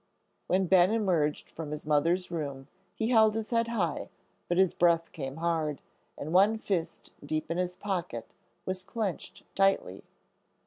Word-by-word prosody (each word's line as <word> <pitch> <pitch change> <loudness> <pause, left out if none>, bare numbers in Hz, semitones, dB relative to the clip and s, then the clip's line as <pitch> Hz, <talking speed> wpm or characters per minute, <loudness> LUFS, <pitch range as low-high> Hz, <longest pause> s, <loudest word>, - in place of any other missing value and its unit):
When 190 +1 +2
Ben 185 0 +5
emerged 180 -9 0
from 160 -2 -6
his 150 0 -5
mother's 165 +5 +1
room, 140 -5 -4 0.3
he 220 0 -1
held 220 -3 +5
his 225 +1 -3
head 230 -1 +2
high, 200 -9 -1 0.4
but 175 - 0
his 190 -1 +4
breath 170 -1 +2
came 135 -3 -5
hard, 160 -3 -1 0.4
and 155 +3 -5
one 200 +4 +5
fist 190 -6 -3
deep 155 +1 -3
in 170 - -1
his 180 0 -1
pocket 180 - -3 0.4
was 185 0 -3
clenched 205 -2 -4
tightly. 195 - +1
175 Hz, 150 wpm, -29 LUFS, 155-195 Hz, 0.4 s, Ben